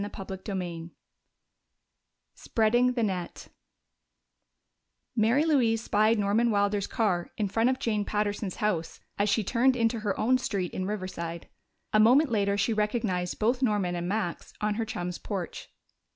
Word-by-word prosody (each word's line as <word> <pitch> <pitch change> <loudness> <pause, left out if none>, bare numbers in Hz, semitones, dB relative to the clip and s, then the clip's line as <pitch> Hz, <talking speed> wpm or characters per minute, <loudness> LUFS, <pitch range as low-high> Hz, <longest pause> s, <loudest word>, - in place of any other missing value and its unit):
Chapter 195 0 -6
XVI 180 -4 -5 1.4
Spreading 240 +3 +2
the 240 -2 0
Net 185 -4 -4 1.7
Mary 235 +7 +3
Louise 235 -8 +2
spied 215 +1 +3
Norman 210 +4 +2
Wilder's 205 -1 +1
car 190 -7 0
in 210 - 0
front 225 +5 +2
of 260 - 0
Jane 215 -4 -1
Patterson's 205 -2 -2
house 175 -6 -2 0.2
as 205 +1 +2
she 215 +2 +2
turned 250 +5 +2
into 230 -1 +1
her 205 -2 -2
own 255 +3 +3
street 195 -7 -2
in 185 0 -3
Riverside; 185 -5 -5 0.4
a 215 - +5
moment 255 +6 +5
later 200 -2 +1
she 215 +3 +1
recognized 210 -4 -1
both 240 +4 +1
Norman 205 -7 +1
and 175 0 -3
Max 200 -4 -3
on 210 0 0
her 225 +2 -2
chum's 180 -4 -4
porch. 195 -5 -5
210 Hz, 145 wpm, -28 LUFS, 190-230 Hz, 1.7 s, a